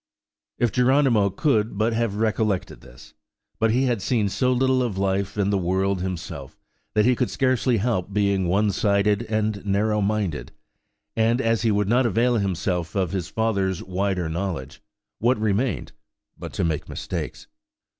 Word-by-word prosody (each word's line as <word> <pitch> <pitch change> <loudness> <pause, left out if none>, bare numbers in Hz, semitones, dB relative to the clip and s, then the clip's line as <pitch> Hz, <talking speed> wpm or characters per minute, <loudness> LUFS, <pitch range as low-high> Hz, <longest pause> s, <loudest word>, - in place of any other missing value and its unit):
If 120 -3 +1
Geronimo 125 -5 +3
could 110 - 0
but 110 +2 +1
have 115 -3 0
recollected 110 -3 -1
this! - - -15 0.5
But 110 - +3
he 125 +4 +2
had 120 -5 0
seen 105 -1 +1
so 125 +5 +1
little 130 +1 +2
of 115 -6 -2
life 100 +1 -1
and 100 0 +1
the 100 - +2
world 95 +1 0
himself, 85 -6 -6 0.4
that 105 0 +4
he 125 0 +4
could 125 0 0
scarcely 130 -2 +1
help 100 -3 -1
being 100 -2 +1
one 100 +4 +2
sided 100 +1 +2
and 110 -2 -1
narrow 105 +2 +1
minded; 100 -6 -2 0.6
and 115 +2 +2
as 115 -3 +1
he 115 - +2
would 105 -1 +1
not 120 +3 +3
avail 120 +3 +2
himself 90 -3 -2
of 95 -4 0
his 95 -4 -3
father's 100 -5 -1
wider 95 -1 -1
knowledge, 85 0 -4 0.4
what 120 +2 +2
remained 110 +2 -1 0.4
but - - -8
to - - -1
make 80 -3 -2
mistakes? 85 -4 -5
105 Hz, 160 wpm, -24 LUFS, 95-115 Hz, 0.6 s, that